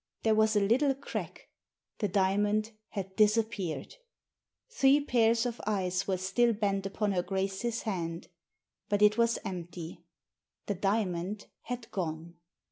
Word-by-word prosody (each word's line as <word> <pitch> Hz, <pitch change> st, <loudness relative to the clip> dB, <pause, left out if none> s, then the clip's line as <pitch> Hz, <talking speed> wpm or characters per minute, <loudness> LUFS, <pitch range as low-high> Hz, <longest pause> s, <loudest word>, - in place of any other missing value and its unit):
There 220 Hz, -, +4 dB
was 220 Hz, 0 st, +3 dB
a -, -, +5 dB
little 260 Hz, +7 st, +3 dB
crack. 275 Hz, -, -6 dB, 0.5 s
The 210 Hz, -, +1 dB
diamond 205 Hz, +3 st, +1 dB, 0.2 s
had 190 Hz, -2 st, -6 dB
disappeared. 215 Hz, -, +1 dB, 0.7 s
Three 290 Hz, -, +4 dB
pairs 235 Hz, -4 st, +2 dB
of 240 Hz, -1 st, -3 dB
eyes 190 Hz, -2 st, 0 dB
were 190 Hz, -1 st, +1 dB
still 210 Hz, +6 st, +2 dB
bent 200 Hz, -2 st, 0 dB
upon 205 Hz, +1 st, -1 dB
her 180 Hz, -2 st, +1 dB
Grace's 195 Hz, +5 st, -2 dB
hand. 170 Hz, -5 st, -3 dB, 0.6 s
But 205 Hz, 0 st, +2 dB
it 210 Hz, +2 st, +5 dB
was 235 Hz, 0 st, +3 dB
empty 175 Hz, -2 st, -6 dB, 0.3 s
— -, -, -60 dB
the 205 Hz, -, -1 dB
diamond 195 Hz, 0 st, -1 dB, 0.2 s
had 245 Hz, -1 st, -5 dB
gone. 165 Hz, -3 st, -4 dB
205 Hz, 135 wpm, -30 LUFS, 190-225 Hz, 0.7 s, a